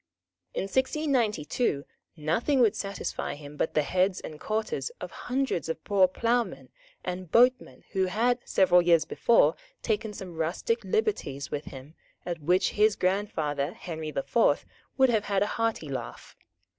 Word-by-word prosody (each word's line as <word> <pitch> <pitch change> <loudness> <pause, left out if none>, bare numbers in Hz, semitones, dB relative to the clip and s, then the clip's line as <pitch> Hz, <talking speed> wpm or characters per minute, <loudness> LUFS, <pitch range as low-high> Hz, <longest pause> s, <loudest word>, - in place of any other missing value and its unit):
In - - 0
1692 235 - 0 0.3
nothing 170 - +1
would 230 -5 +4
satisfy 195 -6 -4
him 145 0 -11
but 160 - -2
the 150 - +3
heads 185 +4 +1
and 155 -1 -9
quarters 220 - -2
of - - -7
hundreds 255 -10 -2
of 160 0 -4
poor 195 -3 +4
ploughmen 195 - -1 0.3
and 180 -2 -5
boatmen 250 +2 +3
who 190 -1 +1
had, 240 +6 +1
several 180 -2 +4
years 170 -3 +4
before, 235 - +3 0.3
taken 220 -1 -1
some 190 -3 -8
rustic 185 - -1
liberties 415 - -1
with 145 - -3
him 135 +3 -10 0.3
at 175 -2 -3
which 180 +5 +2
his 210 0 +3
grandfather 165 -6 -1
Henry 160 -3 -6
the 135 -2 -2
Fourth 235 - +2 0.3
would 265 -2 +5
have 215 -3 +1
had 200 -1 +1
a 205 - -3
hearty 225 -9 0
laugh. 135 -2 -7
190 Hz, 150 wpm, -28 LUFS, 160-230 Hz, 0.3 s, would